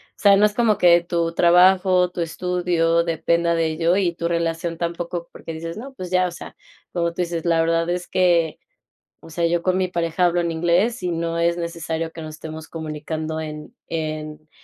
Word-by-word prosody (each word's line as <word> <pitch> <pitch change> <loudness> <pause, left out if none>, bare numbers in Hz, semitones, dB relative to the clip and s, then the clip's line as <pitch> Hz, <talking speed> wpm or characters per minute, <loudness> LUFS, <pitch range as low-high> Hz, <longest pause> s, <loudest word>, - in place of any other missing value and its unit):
sea, 200 -1 +5
no 205 +2 +5
es 210 - -9
como 225 -4 +2
que 175 -1 +6
tu 170 -1 -1
trabajo, 180 +1 +5
tu 175 0 -5
estudio 170 0 0
dependa 170 +1 +1
de 165 -1 +1
ello 165 +2 +1
y 180 -4 +1
tu 170 - -2
relación 170 0 -2
tampoco, 170 0 -4
porque 165 - -8
dices: 165 +2 -6
"No, 265 +4 -8
pues 185 -8 -7
ya, 185 0 +2
o 175 - -6
sea", 170 - -10 0.4
como 170 -1 0
tú 175 - -3
dices: 170 -1 -3
"La 165 -1 +3
verdad 165 +1 +1
es 175 0 -3
que, 175 -4 +2 0.6
o - - -14
sea, 170 +1 -1
yo 170 0 +1
con 185 +1 +1
mi 185 -1 +1
pareja 170 0 0
hablo 175 0 +2
en 170 - -1
inglés 175 +7 +1
y 180 - -1
no 165 0 -2
es 170 +1 +1
necesario 165 -1 -4
que 165 -1 -8
nos 155 0 -7
estemos 160 0 -8
comunicando 155 0 -5
en 155 +7 -7
en 155 -1 -5
170 Hz, 200 wpm, -22 LUFS, 165-180 Hz, 0.6 s, que